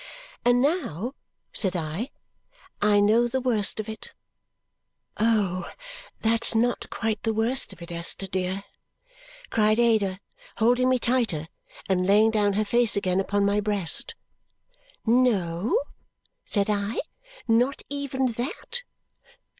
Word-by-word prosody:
"And 245 +1 +4
now," 270 - -1 0.4
said 190 -3 +2
I, 170 - -3 0.7
"I 205 0 +4
know 220 +4 +4
the 260 +2 -1
worst 225 -6 +1
of 215 - -4
it." 220 0 -8 1.1
"Oh, 210 -5 +1 0.5
that's 230 +1 +2
not 240 +2 0
quite 220 -1 -2
the 225 -1 -1
worst 235 +4 +2
of 180 -3 -11
it, 170 - -10
Esther 170 +3 0
dear!" 190 +1 -2 0.9
cried 215 -1 +3
Ada, 215 -5 +2 0.4
holding 245 +3 +3
me 255 - +3
tighter 230 -11 0 0.4
and 185 -1 +1
laying 215 +3 +5
down 205 -2 +2
her 215 +2 0
face 235 +1 +3
again 185 -2 +1
upon 200 +1 +1
my 200 +1 +2
breast. 205 -5 0 0.9
"No?" 220 - +2 0.7
said 200 -2 0
I. 205 +1 -1 0.5
"Not 245 +4 +2
even 280 -2 -2
that?" 260 - -3
215 Hz, 120 wpm, -25 LUFS, 195-240 Hz, 1.1 s, laying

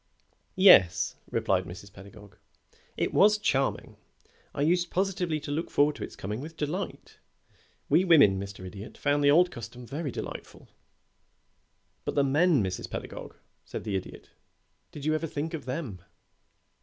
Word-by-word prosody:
"Yes," 100 - +6
replied - - 0
Mrs. 95 +3 -11
Pedagog. 100 +1 -14 0.6
"It - - -1
was 210 +1 +5
charming. 135 -10 -1 0.5
I 140 - -2
used 175 +2 +2
positively 180 -4 -1
to 145 - -6
look 160 +4 -2
forward 145 +1 +2
to - - -6
its - - -8
coming 105 +5 -5
with 160 +2 -9
delight. 155 +7 -5 0.7
We 180 - +4
women, 145 - +5
Mr. 100 -1 -7
Idiot, 100 +3 -9
found 145 0 +1
the 145 - +5
old 175 +5 +5
custom 120 +2 -9
very 145 +4 -4
delightful." - - -8 1.3
"But - - -4
the 140 - +3
men, 145 - +3
Mrs. 95 -1 -4
Pedagog," - - -7 0.3
said - - -7
the 105 -3 -3
Idiot, 95 - -7 0.6
"did 145 -1 -9
you 155 - +2
ever 155 +1 -1
think 155 +3 -4
of 160 - -5
them?" 130 - -5
145 Hz, 150 wpm, -28 LUFS, 105-165 Hz, 1.3 s, Yes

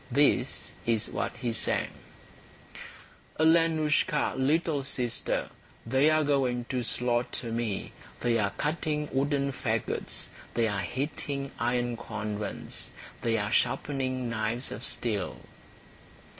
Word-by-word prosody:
This 140 +3 +2
is 115 -1 +1
what - - -1
he 120 -2 -1
sang: 110 - +1 1.5
"Alenoushka, 160 -2 +4
little 145 +2 +2
sister, 125 -3 -1 0.3
They 130 +6 +4
are 155 0 +4
going 130 -4 +2
to 130 -1 0
slaughter 120 0 -1
me; 115 -3 -1 0.3
They 115 -1 +3
are 100 -2 +2
cutting 150 +3 -1
wooden 140 0 +1
fagots, 115 -4 -2 0.3
They 115 -1 +3
are 100 -2 0
heating 140 +2 -2
iron 120 +1 +1
cauldrons, 105 -2 -4 0.3
They 115 -1 +2
are 105 -1 -1
sharpening 130 0 +1
knives 115 +2 -1
of 115 - -6
steel." 105 -8 -1
125 Hz, 110 wpm, -29 LUFS, 115-145 Hz, 1.5 s, Alenoushka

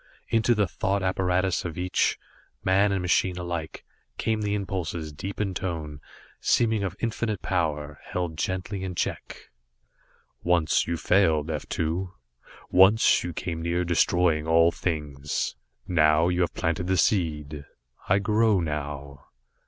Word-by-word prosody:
Into 115 +1 +3
the 105 -1 +2
thought 100 +1 -1
apparatus 95 0 +1
of 85 -3 -5
each, 90 +1 +1 0.5
man 100 +2 +3
and 95 -2 -1
machine 90 0 +1
alike, 85 -3 -5 0.3
came 110 -1 0
the 105 0 0
impulses, 85 -6 -4
deep 95 +7 -6
in 100 -3 -1
tone, 80 -6 -4 0.4
seeming 110 -3 +2
of 95 -2 -3
infinite 115 -3 -2
power, 75 -5 -1
held 90 -3 -3
gently 95 +3 -3
in 90 -1 -4
check. - - -4 0.9
"Once 85 -3 +2
you 85 0 -1
failed, 80 -3 +2
F 75 - -5
2; 85 +3 -2 0.6
once 95 +4 +5
you 85 - -3
came 85 0 -4
near 85 +2 0
destroying 85 -2 +2
all 85 +1 +5
things. 75 -5 -3 0.3
Now 80 -1 +4
you 90 0 0
have 85 - 0
planted 85 +2 -1
the 95 0 +1
seed. 75 -7 0 0.5
I 95 - +5
grow 105 0 +3
now." 75 -3 -5
90 Hz, 135 wpm, -26 LUFS, 80-95 Hz, 0.9 s, once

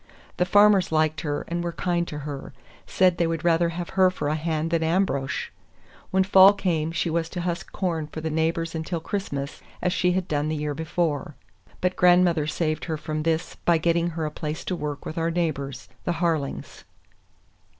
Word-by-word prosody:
The 180 - +1
farmers 205 -2 +5
liked 155 0 +1
her 145 -2 -3
and 170 0 -2
were 170 -1 -3
kind 175 -1 -1
to 150 - -6
her; 140 -2 -6 0.3
said 185 -2 +3
they 170 - +3
would 165 -1 -2
rather 170 0 +3
have 170 +1 -5
her 190 -1 +4
for 150 -5 -3
a - - +1
hand 160 0 -2
than 165 -1 +2
Ambrosch. 160 -5 0 0.6
When 190 0 +3
fall 195 +1 +8
came 165 -6 -1
she 170 0 -1
was 165 0 -1
to 180 - -4
husk 175 +1 -3
corn 165 -5 -2
for 155 - -7
the 160 0 -3
neighbors 165 +1 0
until 165 +1 -3
Christmas, 150 -6 -4 0.2
as 180 0 0
she 180 0 +2
had 185 0 -1
done 150 0 0
the 155 - -1
year 150 -1 -2
before; 160 0 -2 0.5
but 180 0 +1
grandmother 175 -4 +4
saved 155 0 -1
her 160 -2 -2
from 155 0 -3
this 165 +1 -1
by 170 -1 +4
getting 170 +1 +1
her 160 - -1
a 150 - -3
place 155 0 -5
to 185 - -1
work 150 -3 -5
with 160 - -4
our 165 0 +1
neighbors, 140 -6 -2 0.2
the 175 - 0
Harlings. 160 -4 -2
165 Hz, 195 wpm, -25 LUFS, 155-175 Hz, 0.6 s, fall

